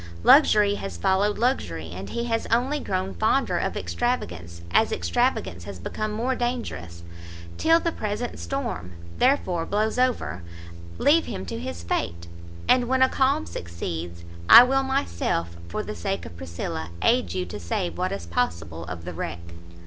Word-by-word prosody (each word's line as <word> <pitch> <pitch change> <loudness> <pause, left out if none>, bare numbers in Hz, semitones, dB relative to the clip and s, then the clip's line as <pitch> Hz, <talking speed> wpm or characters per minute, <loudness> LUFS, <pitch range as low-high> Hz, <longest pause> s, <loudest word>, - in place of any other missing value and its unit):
Luxury 210 -8 +6
has 90 -3 -5
followed 190 - +2
luxury, 85 - -1
and 95 +2 -7
he 235 - -2
has 230 -1 -1
only 255 +6 +1
grown 190 -5 -2
fonder 225 +5 +1
of - - -2
extravagance, 85 - -3
as - - +3
extravagance 85 +1 0
has 100 -1 -7
become 215 - -4
more 235 +5 0
dangerous. 230 - -4 0.6
Till 325 +1 +5
the 335 - -1
present 215 -1 -4
storm, 235 - -4 0.3
therefore, 215 -10 +2
blows 215 +3 0
over, 250 - 0 0.6
leave 320 +3 +4
him 95 - -5
to 85 - -5
his 85 +1 -6
fate, 85 0 -2 0.4
and 250 -1 +4
when 260 +1 +3
a 260 - +4
calm 275 +4 +2
succeeds, 85 0 -6 0.3
I 240 - +12
will 270 +2 +2
myself, 85 - -1
for 85 - -3
the - - -5
sake 85 - -3
of 85 - -10
Priscilla, 85 -1 -5
aid 90 -1 +2
you 90 -1 -1
to 90 +4 -7
save 85 -1 -2
what - - 0
is 100 -3 -4
possible 85 -4 -2
of 85 -1 -7
the 90 - -5
wreck." 85 0 -4
100 Hz, 160 wpm, -25 LUFS, -, 0.6 s, I